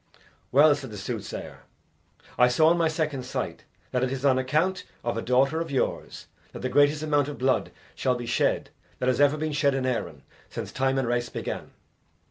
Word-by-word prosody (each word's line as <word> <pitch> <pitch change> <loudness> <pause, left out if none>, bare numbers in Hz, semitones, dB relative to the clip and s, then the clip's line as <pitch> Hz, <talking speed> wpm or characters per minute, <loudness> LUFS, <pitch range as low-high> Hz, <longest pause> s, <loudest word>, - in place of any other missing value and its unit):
"Well," 145 +3 +7
said 145 -3 -6
the 105 - -8
soothsayer, 95 - -6 0.8
"I 125 - +5
saw 155 +6 +4
in 170 - +3
my 165 - +3
second 155 -4 -2
sight 125 - -4 0.3
that 125 0 0
it 130 - 0
is 135 +1 -3
on 130 -2 +4
account 155 +9 0 0.2
of 120 - -1
a 115 - -2
daughter 135 +7 +2
of 165 - -4
yours 135 -2 -2 0.3
that - - -8
the 130 - 0
greatest 145 +2 +3
amount 145 -2 +2
of 145 - -6
blood 130 0 +1 0.2
shall 130 -1 0
be 120 -1 -5
shed 115 - 0 0.3
that - - -2
has 130 +2 +1
ever 145 +1 +4
been 155 0 -2
shed 140 -2 +2
in 135 -1 -1
Erin 85 - -3 0.3
since - - -6
time 135 0 0
and 130 -3 0
race 120 0 0
began. - - -5
135 Hz, 200 wpm, -26 LUFS, 125-150 Hz, 0.8 s, Well